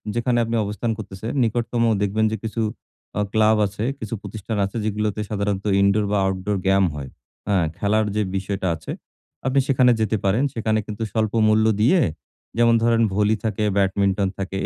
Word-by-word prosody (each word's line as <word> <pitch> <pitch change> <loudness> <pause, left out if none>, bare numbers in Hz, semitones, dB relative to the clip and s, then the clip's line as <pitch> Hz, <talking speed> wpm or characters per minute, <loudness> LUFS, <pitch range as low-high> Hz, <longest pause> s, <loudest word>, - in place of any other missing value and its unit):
যেখানে 120 +1 +1
আপনি 115 +1 -2
অবস্থান 105 +3 -2
করতেছেন 95 +4 -6
নিকটতম 115 +1 0 0.2
দেখবেন 105 +2 +1
যে 110 - -2
কিছু 115 +1 -3 0.6
অ - - +2
ক্লাব 110 0 +4
আছে, 100 +2 -4 0.2
কিছু 110 0 -6
প্রতিষ্ঠান 110 0 -5
আছে 100 +4 -6
যেগুলোতে 105 0 -1
সাধারণত 100 -1 -2 0.2
ইনডোর 100 +2 +3
বা 105 - +2
আউটডোর 95 +1 -1
গেম 95 0 +4
হয়। 70 -2 -6 0.4
আ - - +3 0.2
খেলার 105 +1 +1
যে 105 - +2
বিষয়টা 95 0 -2
আছে, 80 0 -8 0.6
আপনি 135 +1 +3
সেখানে 130 -2 +4
যেতে 110 0 +1
পারেন। 105 +7 +2
সেখানে 110 -1 0
কিন্তু 105 +1 -4
স্বল্প 110 -2 0
মূল্য 110 0 +4 0.2
দিয়ে, 170 - +4 0.6
যেমন 115 0 +5
ধরেন 115 0 +3
ভলি 105 +2 +2
থাকে, 110 -1 -1
ব্যাডমিন্টন 100 0 +2
থাকে 95 0 -4
105 Hz, 170 wpm, -22 LUFS, 100-115 Hz, 0.6 s, যেমন